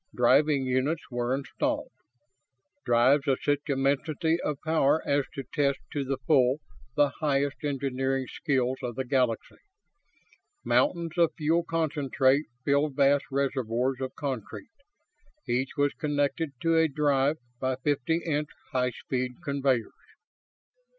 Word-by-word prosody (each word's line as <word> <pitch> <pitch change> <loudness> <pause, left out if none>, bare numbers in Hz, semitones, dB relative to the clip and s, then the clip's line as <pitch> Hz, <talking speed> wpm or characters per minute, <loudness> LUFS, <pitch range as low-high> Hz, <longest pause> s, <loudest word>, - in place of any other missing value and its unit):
Driving 135 +3 +4
units 130 +5 0
were 120 +1 0
installed 135 0 -2 0.9
drives 130 +5 +4
of 135 -2 +3
such 145 0 +2
immensity 145 +4 +1
of 150 - -1
power 160 -1 +2
as 140 -1 +2
to 135 - -4
test 140 -2 +2 0.2
to 145 - -1
the 135 0 -2
full 130 -3 +4 0.4
the 145 -1 +4
highest 140 -1 0
engineering 135 -2 -1
skills 130 -2 -1
of 120 -2 -4
the 130 - -3
Galaxy. 125 -3 0 1.1
Mountains 170 - +1
of 170 -2 +3
fuel 165 +2 +2
concentrate 145 -4 +1 0.2
filled 140 0 +2
vast 140 0 +3
reservoirs 130 -2 -1
of 130 -1 -4
concrete. 135 - -5 0.8
Each 130 +4 -1
was 145 0 +2
connected 145 +1 -1
to 165 0 +3
a 160 - +4
drive 145 0 +1 0.2
by 130 0 0
fifty 145 +4 0
inch 150 -2 -1 0.2
high 125 -2 +1
speed 125 +1 -3
conveyors. 135 -5 0
140 Hz, 125 wpm, -28 LUFS, 130-150 Hz, 1.1 s, Driving